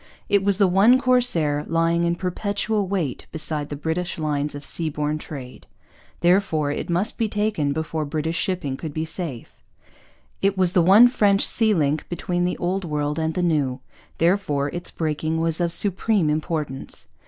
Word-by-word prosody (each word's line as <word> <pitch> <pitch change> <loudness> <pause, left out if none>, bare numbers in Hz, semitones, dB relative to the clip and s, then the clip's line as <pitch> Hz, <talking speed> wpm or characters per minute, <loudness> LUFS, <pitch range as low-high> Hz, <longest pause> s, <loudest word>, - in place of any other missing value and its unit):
It 200 -1 +3
was 200 -1 +2
the 200 -2 +4
one 205 +8 +5
corsair 240 - +2
lying 165 +1 +1
in 170 0 +1
perpetual 200 +3 -2
wait 180 -9 -3
beside 155 -2 -1
the 145 - -4
British 160 +4 -3
lines 150 -2 -2
of 145 0 -8
seaborne 150 -1 -1
trade; 135 -5 -9 0.5
therefore 175 -5 +2
it 145 - -4
must 180 +9 -1
be 225 -2 +1
taken 205 -9 0
before 160 +1 -2
British 155 +2 -3
shipping 160 -8 -2
could 155 -1 -7
be 160 0 -1
safe. 160 -7 -7 0.8
It 195 0 +1
was 185 -2 +3
the 180 -2 +3
one 200 +8 +7
French 205 -5 +3
sea 220 -2 +3
link 150 -1 0
between 175 0 -2
the 180 - -2
Old 185 +2 -2
World 150 -1 -2
and 160 0 -1
the 180 - 0
New; 145 -6 0 0.4
therefore 165 -5 +1
its 175 +4 -5
breaking 160 0 -2
was 165 +1 +2
of 170 -1 0
supreme 195 -2 +1
importance. 155 -3 -3
165 Hz, 165 wpm, -23 LUFS, 150-195 Hz, 0.8 s, one